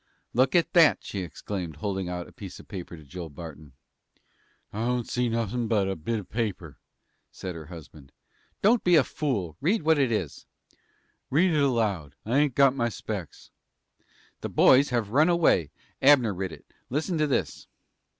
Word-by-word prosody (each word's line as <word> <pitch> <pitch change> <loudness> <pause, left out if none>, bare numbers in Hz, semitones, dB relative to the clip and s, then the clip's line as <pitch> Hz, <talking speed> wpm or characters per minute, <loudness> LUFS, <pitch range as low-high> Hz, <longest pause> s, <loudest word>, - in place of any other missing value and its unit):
"Look 130 +4 +2
at 170 - +2
that," 165 -4 +5
she 100 - -5
exclaimed, 90 -2 -5
holding 95 +2 -3
out 90 -1 -4
a - - -15
scrap 100 -6 -10
of - - -38
paper 90 -3 -7
to 80 - -13
Joel 85 +3 -8
Barton. 75 -2 -10 1.0
"I 110 +2 -2
don't 125 -1 -1
see 125 -1 0
nothin' 115 +1 -1
but 105 -4 +1
a 95 - -2
bit 105 +8 -3
of 105 - -7
paper," 100 - -3 0.5
said 90 -1 -6
her 80 -3 -9
husband. 80 -5 -12 0.5
"Don't 230 +4 +4
be 175 -1 +5
a 155 - +6
fool! 100 - -3
Read 185 +5 +1
what 160 -1 +3
it 130 -4 +2
is." 95 -10 -3 0.8
"Read 170 +5 +3
it 150 - +2
aloud. 105 - 0
I 120 +6 +2
ain't 145 -4 +1
got 135 -1 +5
my 120 -3 0
specks." 100 -7 -7 0.9
"The - - -5
boys 135 +2 +5
have 115 -5 -1
run 155 +7 +4
away. 160 - +3 0.3
Abner 130 -6 +5
writ 95 -1 -4
it. - - -12 0.2
Listen 160 +5 -1
to 155 - +2
this." 135 - -2
110 Hz, 175 wpm, -27 LUFS, 90-140 Hz, 1.0 s, a